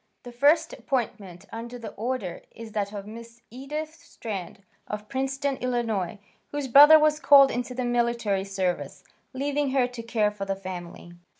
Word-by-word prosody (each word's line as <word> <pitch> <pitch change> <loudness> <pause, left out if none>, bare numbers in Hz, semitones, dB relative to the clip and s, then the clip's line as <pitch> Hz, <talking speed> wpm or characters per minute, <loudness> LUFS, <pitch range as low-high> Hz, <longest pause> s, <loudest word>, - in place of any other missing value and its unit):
The 245 - -9
first 300 +7 +3
appointment 225 -8 -4
under 235 +2 -7
the 230 -2 -8
order 220 -6 -4
is 230 -1 -11
that 205 -1 -2
of 200 -2 -7
Miss 230 +2 -11
Edith 300 +5 -5
Strand, 200 - -8 0.2
of 210 0 -6
Princeton, 270 +1 -2
Ill., 225 -7 -2 0.3
whose 290 -2 -3
brother 290 +5 +9
was 305 0 +3
called 275 -2 +7
into 245 +1 -4
the 255 0 -2
military 235 -5 0
service, 190 -2 -3 0.3
leaving 285 +1 -1
her 265 -2 +3
to 245 -2 -7
care 225 -2 0
for 205 -1 -6
the 195 0 -2
family. 175 -2 -8
235 Hz, 160 wpm, -26 LUFS, 205-270 Hz, 0.3 s, brother